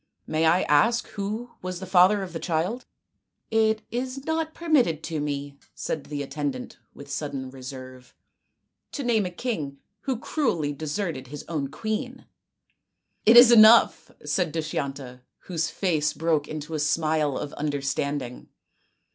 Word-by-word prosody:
May 160 +1 +1
I 175 +3 +4
ask 150 +12 +3
who 215 +4 -4
was 185 -1 -5
the 190 - -6
father 190 +2 +4
of 180 -3 -8
the 165 - -4
child? 180 +10 -2 0.2
" - - -53
" - - -52
It 220 -1 +2
is 255 +3 -4
not 320 0 -2
permitted 255 - +2
to 160 -2 -3
me," 145 -1 -4 0.2
said 155 - -4
the 145 -1 -4
attendant 140 -2 -5 0.2
with 140 - -11
sudden 140 -2 -4
reserve, 130 -1 -10 0.4
" - - -54
to 285 - -3
name 225 -5 +2
a - - -4
king 175 - -4 0.2
who 260 +3 -2
cruelly 220 - -1
deserted 150 -2 -4
his 145 +2 -8
own 150 -5 -2
queen." 220 - -4 0.5
" - - -50
It 230 +2 +8
is 240 0 +10
enough! 225 0 +7
" - - -41
said 180 -5 0
Dushyanta, 140 -5 -4 0.2
whose 165 -3 -2
face 155 -6 0
broke 160 -3 0
into 155 +1 -6
a 155 - -1
smile 150 -1 +1
of 145 - -5
understanding. 140 -3 -3
160 Hz, 155 wpm, -25 LUFS, 145-220 Hz, 0.5 s, is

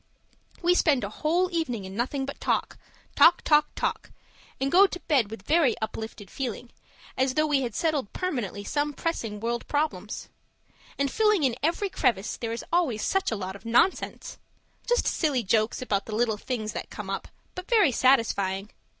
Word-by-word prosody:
We 350 +1 +5
spend 295 -9 +3
a 200 - -4
whole 345 - 0
evening 245 - -2
in 190 +1 -8
nothing 265 +4 -1
but 280 - -7
talk - - -1 0.4
talk 335 - +6
talk 300 -1 +1 0.5
and 270 +1 0
go 390 +3 +7
to 360 - -7
bed 265 - +2
with 225 - -8
a - - -31
very 305 -6 +3
uplifted 220 -2 -6
feeling, 245 -2 -5 0.4
as 260 0 +1
though 310 - +3
we 290 -3 +2
had 240 -4 -3
settled 305 - 0
permanently 240 - -3
some 295 +5 -1
pressing 230 -10 -3
world 235 +2 -3
problems. 300 +1 -2 0.7
And 280 -1 0
filling 425 -4 +3
in 255 -4 +2
every 340 +6 0
crevice, 245 - 0
there 230 -1 -4
is 230 - -5
always 295 -12 +1
such 385 0 +1
a 225 - -1
lot 190 -2 -5
of 200 - -12
nonsense 235 +11 +1 0.5
just 485 0 +2
silly 285 -7 +1
jokes 215 +4 +1
about 200 -5 -1
the 215 - -4
little 225 -1 +1
things 215 -2 -4
that - - -5
come - - -6
up - - -4 0.3
but 365 +1 -8
very 425 - +5
satisfying. 210 -6 +2
260 Hz, 175 wpm, -27 LUFS, 220-320 Hz, 0.7 s, go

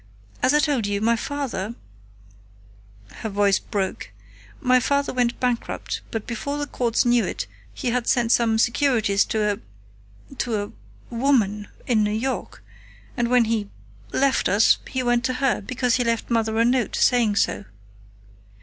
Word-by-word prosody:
As 260 +3 +3
I - - +6
told 285 -8 +1
you, 200 0 -1
my 230 +2 +2
father" 235 -5 -4 1.4
her 220 - -4
voice 200 -1 +2
broke 195 -3 -3 0.5
"my 255 -3 +4
father 280 +2 0
went 245 -1 0
bankrupt, 245 -2 -2
but 225 -2 -4
before 280 +5 -4
the 290 - -2
courts 240 -5 0
knew 240 -1 +4
it - - -3 0.3
he 255 - -3
had 245 -1 -1
sent 240 -3 +2
some 230 -2 +3
securities 230 -4 +2
to 210 -1 0 0.8
a - - -11
to 225 -3 0
a 205 - -9 0.4
woman 220 -6 +1 0.2
in 225 -4 +2
New 210 - +1 0.2
York, 220 - -6 0.5
and 240 - 0
when 245 -1 +4
he 220 -2 -1 0.4
left 275 0 +2
us, 200 +4 +4
he 260 -1 -2
went 240 -1 +2
to 255 - 0
her, 260 -2 0
because 250 +3 0
he 250 - +1
left 230 0 -1
Mother 225 -1 +1
a 230 - +4
note 245 -2 +1
saying 235 -5 +3
so. 200 - 0
235 Hz, 160 wpm, -23 LUFS, 220-255 Hz, 1.4 s, I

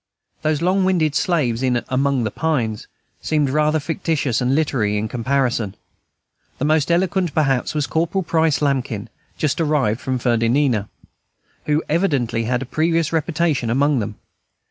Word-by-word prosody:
Those 155 +1 0
long 185 +2 +2
winded 170 -6 +2
slaves 145 -9 0
in 125 -2 0
"Among 135 -1 +1
the 110 - -2
Pines" 120 -10 -1 0.3
seemed 150 -4 0
rather 155 +2 +2
fictitious 155 - -1
and 125 +2 +1
literary 120 -9 +1
in 105 +1 -1
comparison. 120 -3 -1 0.8
The 140 - -2
most 155 0 +2
eloquent, 180 -1 +1
perhaps, 135 -3 +1
was 150 -2 +1
Corporal 170 +5 -1
Price 160 -3 +1
Lambkin, 130 -7 -1 0.3
just 150 +2 0
arrived 140 -8 +1
from 130 -1 -1
Fernandina, 120 -1 +1 0.8
who 150 +1 +1
evidently 140 -9 0
had 125 +2 0
a - - -7
previous 165 +4 0
reputation 155 -6 0
among 140 +3 +2
them. 105 -1 -4
145 Hz, 145 wpm, -20 LUFS, 120-160 Hz, 0.8 s, long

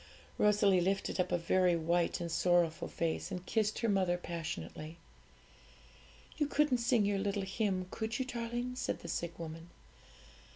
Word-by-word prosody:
Rosalie 200 -3 +4
lifted 195 +2 0
up 180 - +1
a 175 - +3
very 175 +1 +3
white 170 +1 +1
and 170 -1 -4
sorrowful 175 -1 +2
face, 165 +1 -2
and 185 -2 -5
kissed 215 +1 +1
her 230 - 0
mother 190 -4 +2
passionately. 160 - -6 1.4
'You 295 - +1
couldn't 290 -4 +2
sing 235 -3 +3
your 200 -1 +1
little 200 0 -1
hymn, 190 -1 -1
could 220 0 -3
you, 260 - -1
darling?' 240 0 -3
said - - -2
the - - -8
sick 170 0 -3
woman. 165 0 -7
185 Hz, 155 wpm, -33 LUFS, 170-220 Hz, 1.4 s, Rosalie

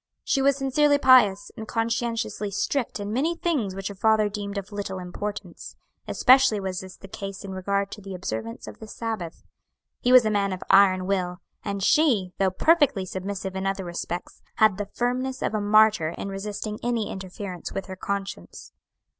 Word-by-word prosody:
She 275 - +1
was 275 0 +3
sincerely 285 +2 +3
pious, 245 -8 +5
and 220 - -7
conscientiously 230 -2 -1
strict 230 +5 -2
in 205 +1 -4
many 310 +8 +1
things 275 - -1
which 195 0 -4
her 200 - -5
father 215 +1 +3
deemed 200 0 -5
of 200 +1 -5
little 200 -2 -4
importance; 185 +1 -6 0.3
especially 260 -4 +5
was 190 -2 -3
this 190 0 -10
the 195 - -12
case 195 0 -7
in 195 - -6
regard 200 +1 -1
to 205 - -8
the 195 -1 -7
observance 115 -10 -5
of 105 - -10
the 220 - -9
Sabbath. 215 -7 -5 0.6
He 245 - +1
was 255 -2 +8
a 215 - +2
man 200 -2 +1
of 185 - -6
iron 185 -2 +5
will, 180 -2 -1 0.3
and 200 -2 -3
she, 220 - +3
though 195 -1 +3
perfectly 280 - +3
submissive 190 +1 -5
in 190 0 -2
other 195 -1 -2
respects, 175 0 -5
had 215 -3 +4
the 205 - -3
firmness 255 +2 -2
of - - -1
a 215 - 0
martyr 215 -5 +4
in 195 - -4
resisting 210 +2 -5
any 235 -3 -1
interference 190 -1 -7
with 195 - -4
her 190 - -7
conscience. 195 +1 -5
200 Hz, 180 wpm, -25 LUFS, 190-225 Hz, 0.6 s, was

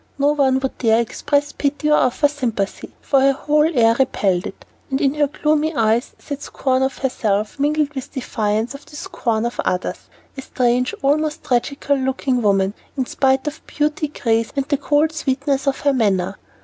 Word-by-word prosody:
No 285 +1 +3
one 270 -3 +2
would 265 - -3
dare 225 -2 +3
express 285 +5 0
pity 290 +1 -1
or 300 - +6
offer 255 +4 +3
sympathy, 245 -9 -3
for 275 -2 +2
her 275 +1 +4
whole 300 +2 +2
air 230 -6 +4
repelled 195 -8 +1
it, - - -11 0.2
and 265 0 0
in 275 -1 +2
her 295 -1 +2
gloomy 305 +2 0
eyes 225 +1 +1
sat 285 -1 -7
scorn 260 -2 -1
of 265 0 0
herself 215 -3 -1
mingled 295 +1 +1
with 265 -3 -6
defiance 220 -3 -2
of 280 +1 -10
the 300 - -13
scorn 250 -10 -2
of 235 - -4
others. 180 - -3 0.3
A 270 - -6
strange, 250 -1 0
almost 305 +3 +1
tragical 280 +3 0
looking 265 -1 0
woman, 195 -2 +2 0.2
in 260 - 0
spite 265 +2 +1
of 300 +1 -5
beauty, 300 +1 -1
grace, 230 -5 0
and 275 -1 -1
the 285 - +2
cold 295 +2 +2
sweetness 280 -2 -1
of 270 - 0
her 285 -1 +2
manner. 195 -6 0
270 Hz, 180 wpm, -20 LUFS, 235-290 Hz, 0.3 s, or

